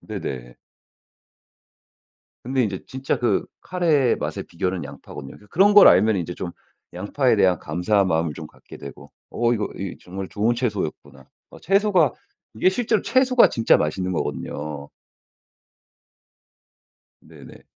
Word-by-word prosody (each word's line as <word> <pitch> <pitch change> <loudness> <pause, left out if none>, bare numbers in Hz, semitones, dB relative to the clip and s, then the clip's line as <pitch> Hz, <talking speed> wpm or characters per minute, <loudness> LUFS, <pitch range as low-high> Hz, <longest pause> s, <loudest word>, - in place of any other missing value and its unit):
네네. - - -7 1.9
근데 130 +1 0
이제 100 -3 -4
진짜 130 +1 -3
그 120 -5 +1 0.2
카레의 160 -9 +1
맛의 - - -4
비결은 90 +1 -3
양파거든요. 70 0 -10
그니까 105 - -19
그런 200 +4 +4
걸 205 - +9
알면 110 -1 +4
이제 90 -1 -4
좀 90 - -5 0.4
양파에 110 +7 0
대한 90 -4 +3
감사한 95 +5 0
마음을 80 -2 0
좀 - - -8
갖게 - - -15
되고 70 - -11 0.2
'어 120 0 +1
이거 105 -3 -1
이 95 -1 -5
정말 95 +1 -7
좋은 110 +3 0
채소였구나.' 100 - -4 0.3
어 - - -14
채소가 195 -4 +3 0.4
이게 110 - +3
실제로 220 +2 0
채소가 255 -1 +4
진짜 115 -1 +3
맛있는 90 +5 -2
거거든요. 75 -3 -4 2.3
네네. - - -15
105 Hz, 285 characters per minute, -22 LUFS, 90-135 Hz, 2.3 s, 걸